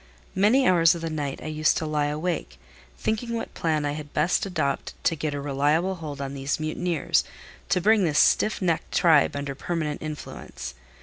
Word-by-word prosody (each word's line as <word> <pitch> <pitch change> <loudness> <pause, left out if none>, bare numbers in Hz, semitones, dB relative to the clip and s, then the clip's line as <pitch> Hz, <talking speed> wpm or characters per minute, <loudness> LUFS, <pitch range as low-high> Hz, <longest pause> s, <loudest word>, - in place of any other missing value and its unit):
Many 225 +8 +4
hours 170 -2 +5
of 170 - -6
the 165 -1 -3
night 145 -3 -3
I - - -9
used 155 0 +1
to 160 - -2
lie 150 -1 0
awake, 150 - -3 0.4
thinking 230 - -2
what 230 - -5
plan 155 -3 0
I 145 - 0
had 145 0 -7
best 170 +5 +2
adopt 140 -7 -2
to 165 - +2
get 150 -1 -3
a - - -3
reliable 145 +6 +1
hold 155 -6 -7
on 140 -1 -4
these 140 +1 -2
mutineers, 155 +1 0 0.5
to - - +3
bring 210 +2 +4
this 155 -4 +1
stiff 215 - +3
necked 170 -3 0
tribe 160 -6 +4
under 140 -1 -3
permanent 150 +1 -3
influence. 155 -1 -7
155 Hz, 185 wpm, -25 LUFS, 145-180 Hz, 0.5 s, hours